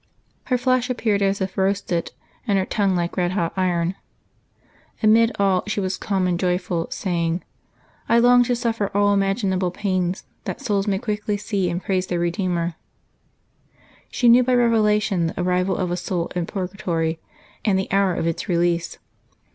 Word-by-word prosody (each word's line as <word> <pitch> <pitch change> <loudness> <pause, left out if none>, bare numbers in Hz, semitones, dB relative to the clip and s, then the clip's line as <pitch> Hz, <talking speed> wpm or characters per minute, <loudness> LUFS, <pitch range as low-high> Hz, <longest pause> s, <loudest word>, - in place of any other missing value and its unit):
Her 250 - +1
flesh 255 0 +1
appeared 220 -5 0
as 195 0 +1
if 190 -1 -3
roasted, 190 -3 0 0.4
and 200 -2 +2
her 190 - +1
tongue 195 -2 +1
like 175 +1 -2
red 180 0 +1
hot 170 -4 -1
iron. 180 -2 0 1.1
Amid 225 +2 +5
all 195 -2 +2
she 210 - -1
was 190 -1 -1
calm 190 -2 -1
and 175 -1 0
joyful, 180 -2 -1
saying, 170 -2 -2 0.3
" - - -34
I 235 - +5
long 245 +1 +6
to 245 0 +1
suffer 230 -4 -1
all 205 0 +4
imaginable 195 -2 +1
pains, 185 -1 -2 0.2
that - - -4
souls 205 -7 -1
may 195 -1 +1
quickly 210 0 -2
see 200 -3 -1
and 175 +2 -3
praise 185 -1 -1
their 175 -1 -1
Eedeemer." 175 -1 -1 1.4
She 245 - +1
knew 240 +2 +7
by 250 0 +2
revelation 210 -6 +2
the 165 - -5
arrival 180 +1 +1
of 180 -2 -1
a 175 - -1
soul 175 -1 -3
in 175 -2 -1
purgatory, 175 -4 -2 0.4
and 200 -4 +2
the 190 - -3
hour 195 -2 +2
of - - -2
its 165 +2 -2
release. 170 -1 0
190 Hz, 170 wpm, -22 LUFS, 180-210 Hz, 1.4 s, knew